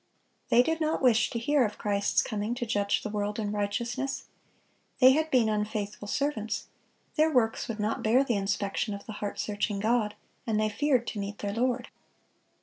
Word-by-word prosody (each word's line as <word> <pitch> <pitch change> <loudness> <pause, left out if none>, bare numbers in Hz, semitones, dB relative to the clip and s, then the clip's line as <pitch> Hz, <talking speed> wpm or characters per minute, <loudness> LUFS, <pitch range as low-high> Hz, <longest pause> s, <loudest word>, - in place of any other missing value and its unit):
They 240 +1 +6
did 325 +3 -1
not 310 -2 0
wish 240 -2 +4
to - - -4
hear 280 +4 +2
of 210 -2 -2
Christ's 200 -1 +1
coming 215 +2 -2
to 245 -1 -3
judge 205 -3 0
the - - -3
world 210 0 -2
in 210 -2 -2
righteousness. 235 +6 -2 0.7
They 255 0 +8
had 315 +3 +1
been 250 -6 +4
unfaithful 210 -1 -2
servants, 220 -4 -1 0.5
their 315 +1 +4
works 230 -5 +1
would 225 -2 -5
not 210 +2 -1
bear 240 +5 +4
the 250 - 0
inspection 200 +1 -1
of 200 - -10
the - - -7
heart 205 -1 -3
searching 205 -1 -2
God, 220 0 +1 0.3
and 215 -1 +1
they 215 0 +2
feared 255 +2 +1
to 215 - -4
meet 200 +1 -4
their 200 -1 -3
Lord. 245 +2 0
220 Hz, 185 wpm, -28 LUFS, 205-250 Hz, 0.7 s, They